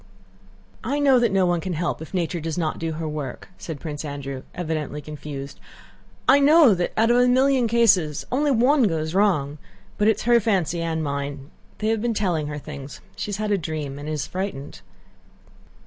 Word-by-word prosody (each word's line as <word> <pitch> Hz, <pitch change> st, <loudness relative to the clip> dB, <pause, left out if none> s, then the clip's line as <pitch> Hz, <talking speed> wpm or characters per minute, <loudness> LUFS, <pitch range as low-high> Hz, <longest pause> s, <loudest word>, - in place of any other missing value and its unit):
"I 270 Hz, +6 st, -1 dB
know 275 Hz, -3 st, +5 dB
that 235 Hz, -3 st, +2 dB
no 195 Hz, -1 st, +3 dB
one 175 Hz, -1 st, +1 dB
can 185 Hz, 0 st, -3 dB
help 170 Hz, 0 st, -2 dB
if 160 Hz, -, -9 dB
nature 175 Hz, -2 st, -1 dB
does 160 Hz, +1 st, -4 dB
not 160 Hz, -3 st, -1 dB
do 165 Hz, -1 st, -2 dB
her 160 Hz, 0 st, -4 dB
work," 150 Hz, -4 st, -6 dB
said 160 Hz, -4 st, -6 dB
Prince 150 Hz, 0 st, -6 dB
Andrew, 140 Hz, -2 st, -5 dB
evidently 155 Hz, -4 st, -3 dB
confused. 145 Hz, -2 st, -8 dB, 0.7 s
"I 270 Hz, +2 st, +7 dB
know 290 Hz, -3 st, +6 dB
that 175 Hz, -1 st, -1 dB
out 225 Hz, +2 st, +4 dB
of 240 Hz, -, +4 dB
a 250 Hz, 0 st, +5 dB
million 260 Hz, 0 st, +3 dB
cases 205 Hz, -10 st, +3 dB
only 290 Hz, +4 st, +1 dB
one 265 Hz, +3 st, +4 dB
goes 160 Hz, -2 st, -2 dB
wrong, 160 Hz, -8 st, +1 dB, 0.4 s
but 210 Hz, -, +3 dB
it 220 Hz, -, +5 dB
is -, -, -7 dB
her 240 Hz, 0 st, +5 dB
fancy 185 Hz, -6 st, 0 dB
and 160 Hz, -1 st, -2 dB
mine. 140 Hz, 0 st, -4 dB, 0.3 s
They 215 Hz, -, -1 dB
have 225 Hz, -1 st, 0 dB
been 235 Hz, -1 st, -1 dB
telling 175 Hz, -8 st, 0 dB
her 150 Hz, 0 st, -5 dB
things. 140 Hz, -2 st, -8 dB, 0.2 s
She -, -, -4 dB
has 205 Hz, -, -2 dB
had 215 Hz, 0 st, -2 dB
a 200 Hz, -, +2 dB
dream 150 Hz, -4 st, -5 dB
and 145 Hz, +1 st, -6 dB
is 150 Hz, -2 st, -2 dB
frightened." 185 Hz, -7 st, -5 dB
170 Hz, 195 wpm, -23 LUFS, 150-220 Hz, 0.7 s, I